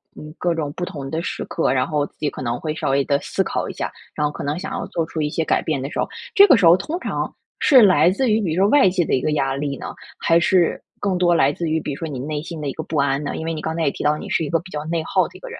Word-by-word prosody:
嗯， 150 Hz, 0 st, -10 dB
各 175 Hz, -1 st, 0 dB
种 150 Hz, -3 st, -2 dB
不 180 Hz, -, -5 dB
同 145 Hz, -7 st, -7 dB
的 160 Hz, +3 st, -2 dB
时 -, -, -4 dB
刻， 165 Hz, -, 0 dB
然 130 Hz, +1 st, +1 dB
后 150 Hz, -3 st, 0 dB
自 -, -, -17 dB
己 150 Hz, -, -1 dB
可 -, -, -9 dB
能 120 Hz, -1 st, -2 dB
会 155 Hz, -1 st, -3 dB
稍 -, -, -2 dB
微 140 Hz, +1 st, +2 dB
地 140 Hz, -1 st, +2 dB
思 -, -, -1 dB
考 -, -, -3 dB
一 -, -, -6 dB
下， -, -, -4 dB, 0.2 s
然 150 Hz, -, 0 dB
后 150 Hz, -, 0 dB
可 -, -, -7 dB
能 145 Hz, +2 st, -2 dB
想 195 Hz, +7 st, -5 dB
要 245 Hz, -, -3 dB
做 165 Hz, -, -2 dB
出 160 Hz, -1 st, -4 dB
一 150 Hz, -, 0 dB
些 160 Hz, +1 st, -1 dB
改 -, -, +2 dB
变 150 Hz, -5 st, -2 dB
的 135 Hz, -, -4 dB
时 -, -, -4 dB
候， -, -, +1 dB, 0.3 s
这 400 Hz, -2 st, +9 dB
个 300 Hz, -, +7 dB
时 195 Hz, -, +3 dB
候 165 Hz, +1 st, +8 dB
通 300 Hz, -, -4 dB
常 -, -, -3 dB, 0.3 s
是 260 Hz, -4 st, +6 dB
来 180 Hz, -5 st, +6 dB
自 245 Hz, +5 st, 0 dB
于 215 Hz, +1 st, +2 dB
比 175 Hz, -6 st, -1 dB
如 180 Hz, -, +1 dB
说 200 Hz, -, +4 dB
外 285 Hz, -6 st, +5 dB
界 180 Hz, -2 st, 0 dB
的 -, -, -2 dB
一 130 Hz, -, +2 dB
个 155 Hz, -, 0 dB
压 135 Hz, -2 st, 0 dB
力 140 Hz, -1 st, -3 dB
呢？ -, -, -7 dB, 0.3 s
还 165 Hz, 0 st, +3 dB
是 175 Hz, 0 st, +2 dB, 0.2 s
更 195 Hz, -3 st, 0 dB
多 175 Hz, -1 st, +3 dB
来 140 Hz, -3 st, +3 dB
自 165 Hz, +2 st, -3 dB
于， 160 Hz, +1 st, +1 dB
比 150 Hz, -, -5 dB
如 -, -, -7 dB
说 165 Hz, -, -4 dB
你 140 Hz, -4 st, -5 dB
内 150 Hz, +3 st, -3 dB
心 165 Hz, 0 st, -7 dB
的 145 Hz, -, -3 dB
一 135 Hz, -, -3 dB
个 160 Hz, -, -5 dB
不 155 Hz, -, -4 dB
安 140 Hz, +1 st, +1 dB
呢？ -, -, -4 dB
因 160 Hz, -, -5 dB
为 165 Hz, -, -2 dB
你 155 Hz, -, -5 dB
刚 160 Hz, -, -3 dB
才 165 Hz, -, -1 dB
也 140 Hz, -, +2 dB
提 -, -, -6 dB
到 150 Hz, +1 st, +2 dB
你 -, -, -8 dB
是 165 Hz, -, +1 dB
一 145 Hz, -, -3 dB
个 165 Hz, -, +2 dB
比 175 Hz, -, -13 dB
较 150 Hz, 0 st, -4 dB
内 165 Hz, +1 st, -1 dB
耗 -, -, +2 dB
的 -, -, -19 dB
一 -, -, -17 dB
个 -, -, -9 dB
人。 470 Hz, -, -8 dB
160 Hz, 375 characters per minute, -21 LUFS, 145-180 Hz, 0.3 s, 这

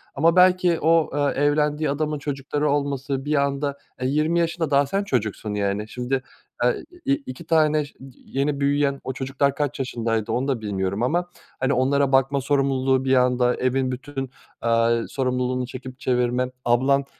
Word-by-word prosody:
ama 165 Hz, +4 st, +3 dB
belki 180 Hz, -2 st, +4 dB
o, 165 Hz, +1 st, +3 dB, 0.2 s
eee, 140 Hz, -, -1 dB
evlendiği 150 Hz, +1 st, +1 dB
adamın 150 Hz, +1 st, -1 dB
çocukları 145 Hz, +1 st, -2 dB
olması 140 Hz, -1 st, -1 dB
bir 150 Hz, +1 st, +1 dB
anda, 140 Hz, 0 st, 0 dB, 0.2 s
eee, 130 Hz, -, +1 dB
20 155 Hz, +5 st, +1 dB
yaşında 165 Hz, -2 st, -1 dB
daha 140 Hz, 0 st, +4 dB
sen 195 Hz, +8 st, -1 dB
çocuksun, 110 Hz, -, -2 dB
yani, 100 Hz, +1 st, -1 dB
şimdi, 125 Hz, +3 st, -2 dB, 0.4 s
eee, 125 Hz, -, +1 dB, 0.2 s
i 275 Hz, -, +3 dB
iki 170 Hz, -, -6 dB
tane 155 Hz, -2 st, +3 dB, 0.4 s
yeni 140 Hz, +1 st, -1 dB
büyüyen 140 Hz, 0 st, +1 dB
o 130 Hz, -, -4 dB
çocuklar 135 Hz, +2 st, 0 dB
kaç 145 Hz, -1 st, -2 dB
yaşındaydı 115 Hz, -4 st, -1 dB
onu 125 Hz, +4 st, 0 dB
da 130 Hz, -5 st, -1 dB
bilmiyorum 100 Hz, 0 st, -2 dB
ama, 175 Hz, +7 st, 0 dB, 0.3 s
hani, 130 Hz, +1 st, +1 dB
onlara 135 Hz, +2 st, +2 dB
bakma 135 Hz, +1 st, +3 dB
sorumluluğu 135 Hz, -1 st, +1 dB
bir 130 Hz, 0 st, +3 dB
anda 125 Hz, -1 st, +3 dB
evin 130 Hz, 0 st, 0 dB
bütün, 135 Hz, 0 st, -5 dB, 0.3 s
eee, 115 Hz, 0 st, +2 dB
sorumluluğunu 125 Hz, -1 st, -1 dB
çekip 130 Hz, +1 st, -9 dB
çevirme. 125 Hz, -1 st, 0 dB
Ablan 135 Hz, +3 st, +3 dB
135 Hz, 155 wpm, -23 LUFS, 125-145 Hz, 0.4 s, belki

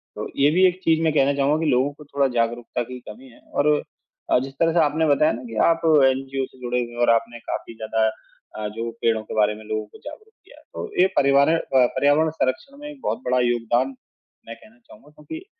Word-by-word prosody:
तो -, -, -5 dB
ये 140 Hz, +1 st, +5 dB
भी 185 Hz, +4 st, +4 dB
एक 180 Hz, 0 st, -2 dB
चीज़ 160 Hz, -1 st, +2 dB
मैं 160 Hz, -2 st, +2 dB
कहना 140 Hz, -1 st, +3 dB
चाहूँगा 140 Hz, +2 st, +1 dB
कि 155 Hz, -, +1 dB
लोगों 130 Hz, +3 st, +2 dB
को 150 Hz, +1 st, -15 dB
थोड़ा 140 Hz, -1 st, 0 dB
जागरूकता 120 Hz, +1 st, -1 dB
की 125 Hz, +2 st, -9 dB
कमी 125 Hz, +5 st, -12 dB
है 120 Hz, -, -19 dB
और 150 Hz, +1 st, +3 dB, 0.6 s
अ, -, -, +5 dB
जिस 135 Hz, +1 st, -6 dB
तरह 165 Hz, 0 st, +2 dB
से 170 Hz, -, +3 dB
आपने 155 Hz, +1 st, +2 dB
बताया 150 Hz, +1 st, +3 dB
ना 120 Hz, +3 st, -6 dB
कि 115 Hz, -, -8 dB
आप 165 Hz, 0 st, +1 dB, 0.2 s
एनजीओ 135 Hz, 0 st, 0 dB
से 130 Hz, -, -20 dB
जुड़े 125 Hz, 0 st, -1 dB
हुए 120 Hz, -, -9 dB
हैं 120 Hz, -, -11 dB
और -, -, +4 dB
आपने 115 Hz, +1 st, +1 dB
काफ़ी 115 Hz, -, -6 dB
ज़्यादा 110 Hz, 0 st, 0 dB, 0.5 s
अ, 105 Hz, -1 st, -3 dB
जो 115 Hz, +2 st, -5 dB
पेड़ों 110 Hz, -1 st, +1 dB
के -, -, -9 dB
बारे 105 Hz, 0 st, +2 dB
में 110 Hz, -, -12 dB
लोगों 110 Hz, 0 st, -3 dB
को 105 Hz, -, -17 dB
जागरूक 430 Hz, +10 st, -11 dB
किया। -, -, -18 dB
तो 445 Hz, -, -6 dB
ये 185 Hz, -, +6 dB
परिवारें 140 Hz, +3 st, +4 dB
अ, -, -, 0 dB, 0.2 s
पर्यावरण 145 Hz, +5 st, +3 dB
संरक्षण 160 Hz, -, -3 dB
में 295 Hz, -1 st, -9 dB
बहुत -, -, -2 dB
बड़ा 125 Hz, 0 st, +2 dB
योगदान 120 Hz, +3 st, 0 dB, 0.5 s
मैं 115 Hz, -, -7 dB
कहना 215 Hz, -, -20 dB
चाहूँगा 225 Hz, -, -18 dB
क्योंकि 320 Hz, -, -10 dB
135 Hz, 225 wpm, -22 LUFS, 120-155 Hz, 0.6 s, ये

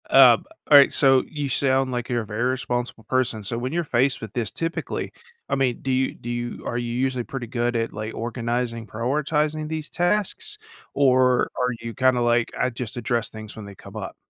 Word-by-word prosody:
Um, -, -, +7 dB, 0.2 s
alright, 140 Hz, -2 st, +8 dB
so, 135 Hz, -2 st, +5 dB
you 145 Hz, -2 st, -3 dB
sound 135 Hz, 0 st, +1 dB
like 120 Hz, 0 st, -3 dB
you're 120 Hz, -2 st, 0 dB
a -, -, -10 dB
very 105 Hz, +3 st, -3 dB
responsible 125 Hz, -2 st, -2 dB
person, 120 Hz, -2 st, 0 dB
so, 115 Hz, +4 st, -3 dB
when 125 Hz, +2 st, -3 dB
you're 170 Hz, +2 st, 0 dB
faced 130 Hz, -2 st, +1 dB
with 110 Hz, -1 st, -7 dB
this, 115 Hz, -6 st, -2 dB
typically 165 Hz, 0 st, -3 dB, 0.4 s
I -, -, 0 dB
mean, 130 Hz, -3 st, 0 dB
do 135 Hz, -, -2 dB
you 130 Hz, +1 st, +1 dB
do 120 Hz, -, -8 dB
you 120 Hz, 0 st, -4 dB
are 120 Hz, -, -2 dB
you 120 Hz, -1 st, -3 dB
usually 130 Hz, -1 st, -1 dB
pretty 135 Hz, -3 st, -5 dB
good 120 Hz, 0 st, -1 dB
at, 115 Hz, 0 st, 0 dB
like, 110 Hz, +1 st, -5 dB
organizing, 115 Hz, 0 st, -2 dB
prioritizing 150 Hz, +6 st, -1 dB
these 155 Hz, -1 st, -4 dB
tasks, 210 Hz, -, 0 dB, 0.4 s
or 130 Hz, -2 st, +3 dB
are 125 Hz, -1 st, +1 dB
you 115 Hz, 0 st, -5 dB
kinda 130 Hz, -1 st, +3 dB
like, 120 Hz, 0 st, +2 dB
"I 125 Hz, -, +1 dB
just 120 Hz, -2 st, -6 dB
address 120 Hz, 0 st, 0 dB
things 110 Hz, -1 st, -9 dB
when 110 Hz, -, -7 dB
they 100 Hz, -1 st, -10 dB
come -, -, -11 dB
up?" -, -, -6 dB
125 Hz, 200 wpm, -24 LUFS, 115-135 Hz, 0.4 s, alright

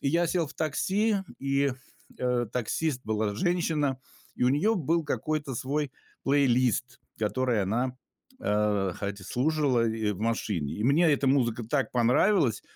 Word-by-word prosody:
И 140 Hz, -, 0 dB
я 170 Hz, +3 st, +2 dB
сел 165 Hz, -1 st, 0 dB
в 145 Hz, -, -12 dB
такси, 200 Hz, +8 st, +1 dB, 0.2 s
и, 140 Hz, 0 st, +1 dB, 0.5 s
э, 125 Hz, -1 st, 0 dB
таксист 125 Hz, +3 st, -1 dB
была 110 Hz, -1 st, -1 dB
женщина, 155 Hz, -, 0 dB, 0.4 s
и -, -, -4 dB
у 125 Hz, -, +5 dB
нее 170 Hz, +12 st, +2 dB
был 165 Hz, -1 st, 0 dB
какой-то 150 Hz, -2 st, -2 dB
свой 140 Hz, +3 st, -2 dB, 0.3 s
плейлист, 130 Hz, -3 st, +2 dB, 0.2 s
который 120 Hz, +1 st, 0 dB
она, 125 Hz, +6 st, -1 dB, 0.5 s
э, 105 Hz, -3 st, +1 dB
хотя 100 Hz, 0 st, -5 dB
слушала 130 Hz, -1 st, +1 dB
и 110 Hz, -2 st, -1 dB
в 95 Hz, -, -9 dB
машине. 105 Hz, -9 st, -1 dB
И 105 Hz, -, -3 dB
мне 155 Hz, +6 st, +4 dB
эта 140 Hz, 0 st, 0 dB
музыка 120 Hz, -4 st, +2 dB
так 135 Hz, +4 st, -1 dB
понравилась, 125 Hz, -, +3 dB
130 Hz, 145 wpm, -28 LUFS, 115-150 Hz, 0.5 s, у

